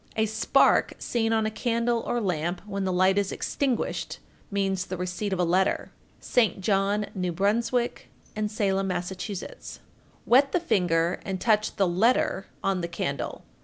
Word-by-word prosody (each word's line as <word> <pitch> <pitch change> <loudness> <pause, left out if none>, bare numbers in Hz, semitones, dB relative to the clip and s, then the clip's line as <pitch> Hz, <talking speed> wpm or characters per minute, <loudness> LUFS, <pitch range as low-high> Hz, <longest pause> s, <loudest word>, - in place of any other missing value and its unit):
A 220 - +2
spark 220 0 +3
seen 225 -2 -1
on 220 -1 +2
a 215 - -1
candle 235 +1 0
or 240 - 0
lamp 175 -4 -2
when 200 -2 -3
the 185 - 0
light 185 +2 +3
is 200 -1 -1
extinguished 265 -4 -2 0.3
means 195 -2 0
the 185 - -4
receipt 180 +3 -3
of 190 - 0
a - - +3
letter. 185 +3 +1 0.3
St. 225 -5 +1
John, 200 +1 +1
N.B., 180 -2 -1 1.1
and 215 -1 -1
Salem, 195 -3 0
Mass. 180 -1 -2
1441. 195 - -7 0.5
Wet 270 +3 +5
the 360 - +3
finger 175 - +1
and 190 -1 -3
touch 215 -1 +2
the 195 -3 +2
"letter" 195 +1 +2 0.2
on 195 -2 +1
the 170 - -2
candle. 140 -5 -4
195 Hz, 160 wpm, -26 LUFS, 185-220 Hz, 1.1 s, Wet